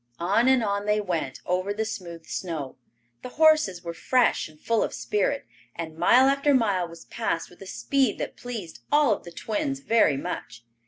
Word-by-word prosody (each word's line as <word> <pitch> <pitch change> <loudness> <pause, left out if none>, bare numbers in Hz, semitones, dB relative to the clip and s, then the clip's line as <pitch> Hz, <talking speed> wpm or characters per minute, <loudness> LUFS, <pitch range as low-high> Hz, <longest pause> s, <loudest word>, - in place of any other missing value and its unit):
On 200 +8 +2
and 260 -2 +4
on 200 0 -1
they 210 0 +3
went, 170 -9 -3
over 185 +2 0
the 220 +2 -2
smooth 175 -7 -7
snow. 155 -7 -4 0.5
The - - -7
horses 310 - +4
were 170 -1 -5
fresh 245 +1 +2
and 155 -1 -19
full 230 +4 +1
of - - -1
spirit, 210 +7 -1 0.3
and 160 -1 -6
mile 255 +10 +5
after 275 +1 +3
mile 200 -8 +1
was 170 0 -13
passed 165 - -3
with 175 - -18
a 195 - -9
speed 270 +7 0
that - - -4
pleased 215 - -7
all 295 -6 +5
of - - -7
the 175 - -9
twins 275 - -2
very 225 - +3
much. 115 -3 -6
205 Hz, 190 wpm, -26 LUFS, 170-250 Hz, 0.5 s, mile